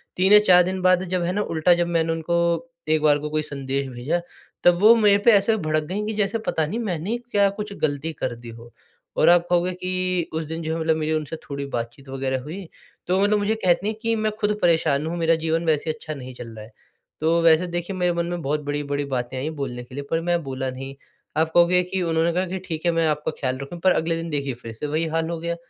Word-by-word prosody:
3 190 +3 +4
या 210 - +11
4 180 -1 +7
दिन 185 +1 -3
बाद 185 0 +4
जब 180 -1 +1
है 175 - 0
ना 205 - 0
उल्टा 165 -2 +2
जब 175 0 0
मैंने 165 -1 +1
उनको 165 +1 -1 0.5
एक 155 -1 +3
बार 150 -1 +4
को 150 +1 -5
कोई 155 0 0
संदेश 140 -2 -3
भेजा, 130 +7 -2 0.4
तब 175 -1 +5
वो 215 +4 +8
मेरे 210 -3 +5
पे 235 - +8
ऐसे 205 +1 +4
भड़क 155 0 +1
गई 195 +7 -3
कि 220 - -3
जैसे 210 +2 +1
पता 160 - +1
नहीं 215 +9 -3
मैंने 200 0 -2
क्या 200 -1 +4
कुछ 210 -1 -5
ग़लती 150 +1 -1
कर - - -1
दी 120 0 -11
हो। 115 +1 -12 0.5
और - - +5
आप 175 0 +5
कहोगे 175 +1 +2
कि 185 -1 -2
उस 160 0 -1
दिन 165 +1 -4
जो 160 0 -2
है - - -3
मतलब 160 0 +2
मेरी 155 0 -1
उनसे 155 0 -3
थोड़ी 140 0 -4
बातचीत 120 +4 -7
वग़ैरह 130 -1 -2
हुई, 170 +7 -8 0.4
तो 185 +2 +2
मतलब 205 +1 +3
मुझे 205 +2 0
कहती 180 +2 +3
हैं 215 - -1
कि 230 -1 0
मैं 215 -1 0
खुद 210 0 0
परेशान 160 -4 +2
हूँ, 170 +2 -3
मेरा 165 0 +3
जीवन 165 +1 0
वैसे 155 -1 +1
अच्छा 155 0 -4
नहीं 130 -3 -8
चल 120 -1 -9
रहा 110 -1 -9
है। 110 - -17 0.5
तो 165 +2 +2
वैसे 165 +1 +5
देखिए 175 +2 -3
मेरे 180 -1 +1
मन 170 0 -1
में 175 0 -4
बहुत 150 +1 -1
बड़ी-बड़ी 145 0 -2
बातें 125 +1 -3
आई 140 +4 -2
बोलने 125 -2 -4
के 125 +1 -13
लिए 140 - -4
पर 165 - +1
मैं 175 0 0
बोला 130 -1 -3
नहीं, 135 +1 -7 0.4
आप 160 0 +2
कहोगे 175 +1 +5
कि 190 - -1
उन्होंने 165 0 +1
कहा 180 +2 0
कि 185 +2 -4
ठीक 160 -1 -5
है 170 - +4
मैं 165 -1 +1
आपका 150 0 -1
ख़्याल 130 -2 -1
रखूँ 155 +5 -7
पर 185 - +5
अगले 165 +1 0
दिन 165 0 -5
देखिए 140 -3 -1
फिर 115 - -6
से 115 +7 -5
वही 155 +3 0
हाल 165 0 0
हो 170 - -3
गया। 170 +1 -3
165 Hz, 250 wpm, -23 LUFS, 145-180 Hz, 0.5 s, या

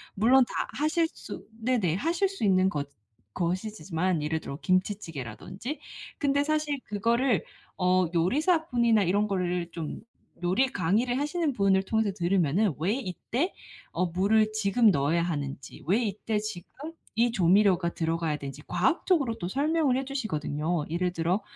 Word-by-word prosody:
물론 250 +6 +5
다 - - -3
하실 310 +3 +2
수 - - -9 0.2
네네 220 -9 +1
하실 335 - +1
수 390 - -6
있는 190 -1 +4
것 145 -5 -3 0.4
것이지만 185 -2 -1
예를 160 +1 -1
들어 140 - -7
김치찌개라든지 185 - -3 0.4
근데 285 -1 +2
사실 300 -1 0
그거를 230 +3 +1 0.4
어 185 0 +3
요리사분이나 240 - +2
이런 200 +4 +2
거를 180 -3 -1
좀 165 -3 -5 0.4
요리 195 +10 +3
강의를 225 +6 0
하시는 300 +1 0
분을 195 -3 +3
통해서 220 0 0
들으면은 180 0 +1
왜 185 +7 +1
이때 255 - -2 0.4
어 180 - +1
물을 210 +5 +2
지금 220 +2 +3
넣어야 150 +2 +1
하는지 140 -5 -5
왜 205 +7 +3
이때 215 +1 -2
지금 210 -5 -6 0.5
이 235 +1 +3
조미료가 185 -2 +4
들어가야 165 -2 -1
되는지 140 +1 -8
과학적으로 315 -7 +1
또 175 - -4
설명을 290 +1 +1
해 265 - -2
주시거든요. 160 - -2
예를 175 +2 0
들어 175 +4 0
200 Hz, 320 characters per minute, -28 LUFS, 175-245 Hz, 0.5 s, 물론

